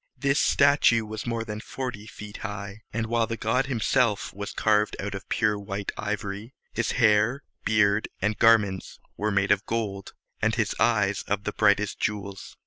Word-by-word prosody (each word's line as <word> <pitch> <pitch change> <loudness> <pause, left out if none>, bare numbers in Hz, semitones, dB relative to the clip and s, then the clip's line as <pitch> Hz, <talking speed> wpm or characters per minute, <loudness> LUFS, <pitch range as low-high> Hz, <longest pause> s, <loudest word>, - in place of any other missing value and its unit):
This 140 0 +1
statue 140 -5 +4
was 110 +2 -6
more 115 -1 -1
than 105 -1 -6
forty 115 -5 -6
feet 105 0 -9
high; 100 0 -6
and, 115 +1 -2
while 115 0 +1
the 115 - -3
god 125 +5 +1
himself 115 -3 +1
was 100 +1 -5
carved 105 -1 +2
out 100 +1 -4
of 95 0 -8
pure 105 -2 +1
white 100 0 -4
ivory, 105 +3 -4 0.2
his 120 - -1
hair, 115 +3 +3 0.2
beard, 105 -1 +3
and 105 +1 -1
garments 105 -5 +3 0.2
were 105 +1 -1
made 100 -1 +1
of 100 - +3
gold, 105 -4 -3 0.3
and - - +2
his - - 0
eyes 105 -4 +2
of 100 0 -1
the 105 - -3
brightest 105 0 +2
jewels. 100 -2 -4
105 Hz, 170 wpm, -26 LUFS, 100-115 Hz, 0.3 s, statue